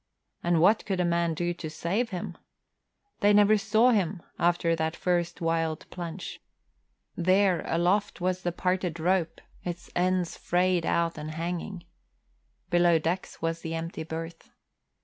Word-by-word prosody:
And 175 -1 +2
what 205 +7 +4
could 190 -2 -1
a 180 - +2
man 170 -1 +1
do 175 +2 -1
to 160 -2 -6
save 190 +9 -1
him? 180 -3 -5 0.8
They 205 +1 +4
never 205 +1 +6
saw 220 +4 +4
him 190 -5 0 0.2
after 170 -1 +2
that 160 0 -1
first 175 -1 -1
wild 165 -1 -1
plunge. 175 0 -6 0.7
There, 185 +1 +3
aloft, 185 +6 +1
was 185 +1 -1
the 175 - -1
parted 180 -1 -1
rope, 175 0 +1 0.2
its 175 -1 -6
ends 180 -1 +1
frayed 180 -1 +1
out 170 -1 +1
and 150 +1 -5
hanging. 170 +3 -4 0.9
Below 175 -1 +5
decks 165 +2 -3
was 165 0 -1
the 165 0 -4
empty 165 +1 -4
berth. 165 +1 -7
175 Hz, 145 wpm, -28 LUFS, 165-185 Hz, 0.9 s, never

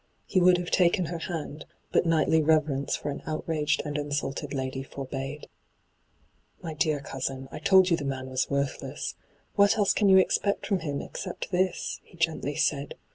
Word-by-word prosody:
He 185 - +2
would 180 0 +6
have 175 0 -4
taken 180 0 +3
her 170 +1 -4
hand, 160 -3 -5 0.3
but - - +2
knightly 160 0 +3
reverence 150 -3 +2
for 145 - -4
an 140 - -6
outraged 155 -1 -1
and 150 0 -2
insulted 145 0 -3
lady 130 -1 -3
forbade. 135 +1 -6 0.6
' - - -39
My 165 -2 -4
dear 155 -2 +1
cousin, 135 0 -4
I - - -6
told 190 -2 +5
you 170 - +4
the 145 - -5
man 135 -1 -3
wa« 130 0 -9
worthless. 140 -1 -2 0.4
What 200 +1 +4
else 205 -2 +3
can 205 -2 +3
you 190 - +8
expect 200 +2 +2
from 195 -2 +1
him 145 -4 -3
except - - -6
this 185 0 0
?' - - -40
he 175 - -19
gently 160 -3 -1
said. 140 0 0
155 Hz, 185 wpm, -27 LUFS, 140-175 Hz, 0.6 s, you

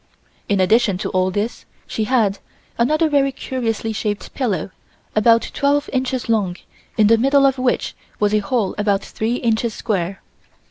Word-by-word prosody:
In 200 -1 +2
addition 200 +1 +3
to - - -3
all 185 0 +1
these, 205 +5 -3 0.2
she 220 - -2
had 210 -5 +1 0.4
another 310 +7 +3
very 280 -2 +2
curiously 230 -4 -3
shaped 210 -1 -3
pillow 200 - -2 0.4
about 230 +2 +4
twelve 285 0 +1
inches 260 -1 -1
long 200 -6 0 0.4
in 215 - +5
the 225 +2 +5
middle 275 +3 +4
of 270 -1 +2
which 255 -1 0 0.3
was 210 0 +2
a 215 - +4
hole 205 -1 -1
about 205 -1 +1
three 225 +2 -2
inches 230 -2 0
square. 190 -3 -2
225 Hz, 155 wpm, -20 LUFS, 205-255 Hz, 0.4 s, in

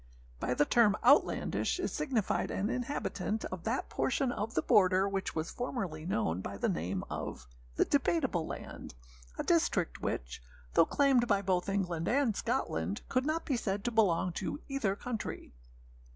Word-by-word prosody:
By 125 - -1
the 150 - +3
term 210 0 +4
âoutlandishâ - - +3
is 370 - -2
signified 270 -9 0
an 205 +5 -1
inhabitant 225 -5 -2
of 185 -2 -6
that 230 +4 -1
portion 265 -1 0
of 225 0 -4
the - - +2
border 190 -3 +4
which 195 -1 -3
was 160 0 -2
formerly 185 -11 -4
known 95 - 0
by 100 - -6
the - - 0
name 90 +4 -2
of - - -5 0.3
âthe - - +3
Debateable 265 - +1
Land,â - - -8 0.4
a - - 0
district - - +1
which, - - -3 0.3
though 165 - +5
claimed 270 -4 +3
by 200 -3 +2
both 185 0 0
England 180 -4 -1
and 250 -4 +2
Scotland, 100 - -1
could 255 +2 +1
not 320 +2 -1
be 275 - 0
said 200 -3 -2
to 240 - -1
belong 190 -5 +3
to 190 - -4
either 250 -9 0
country. 225 0 -5
205 Hz, 165 wpm, -32 LUFS, 170-250 Hz, 0.4 s, though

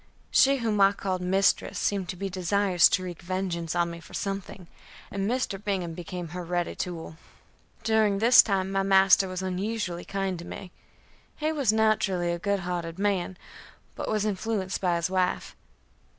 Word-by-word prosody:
She 275 +1 +5
whom 220 -4 0
I 195 0 +6
called 185 -2 -3
mistress 190 +2 +1
seemed 195 -3 -1
to - - -3
be 195 +2 -4
desirous 185 -1 +3
to 185 - 0
wreak 175 -2 -7
vengeance 175 -2 -3
on 170 0 +1
me 170 - -8
for - - -12
something, 195 -2 -4 0.5
and 195 0 -2 0.4
Bingham 185 -5 -2
became 175 0 -6
her 180 +2 -6
ready 175 0 -2
tool. 165 -3 -6 0.7
During 220 -3 +2
this 235 +5 +8
time 195 -2 -1
my 195 0 +1
master 195 0 +5
was 185 0 -4
unusually 190 -1 -3
kind 195 -2 -3
to 170 - -8
me; 185 0 -8 0.6
he 305 +1 -1
was 280 -8 +2
naturally 210 -5 +1
a 170 - -3
good 200 +1 0
hearted 175 -2 -4
man, 190 -2 -1 0.6
but - - -5
was 215 -1 0
influenced 200 -1 -2
by 180 -2 +2
his 170 +2 -1
wife. 185 -1 -1
190 Hz, 165 wpm, -27 LUFS, 175-200 Hz, 0.7 s, this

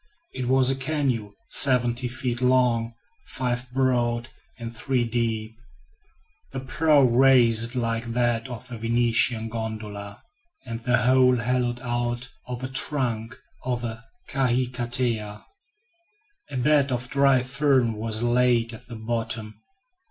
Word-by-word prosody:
It 125 -2 -4
was 130 0 +4
a - - 0
canoe 130 -7 -2
seventy 125 -2 +2
feet 120 0 -3
long, 125 -3 +2 0.3
five 125 -1 -3
broad, 120 -2 0 0.3
and 115 0 -7
three 125 +1 0
deep; 115 -1 -2 0.9
the 135 - -4
prow 145 +2 +3
raised 120 -2 +5
like 115 -1 -2
that 120 -1 0
of 125 0 -9
a 115 - -6
Venetian 115 0 +2
gondola, 110 -3 -6 0.4
and 115 -1 -5
the 125 +1 +1
whole 125 0 +5
hollowed 120 +1 -1
out 120 0 -2 0.2
of 125 0 -6
a - - -2
trunk 130 -4 -1 0.3
of 125 -1 -2
a 115 -1 -5 0.2
kahikatea. 120 -4 -1 1.0
A 135 - -5
bed 140 +1 +3
of 125 0 -2
dry 140 -2 +3
fern 130 -3 +1
was 110 +1 -1
laid 120 -1 +2
at 120 +2 -12
the 120 - -8
bottom. 110 -1 -3
120 Hz, 125 wpm, -25 LUFS, 115-130 Hz, 1.0 s, raised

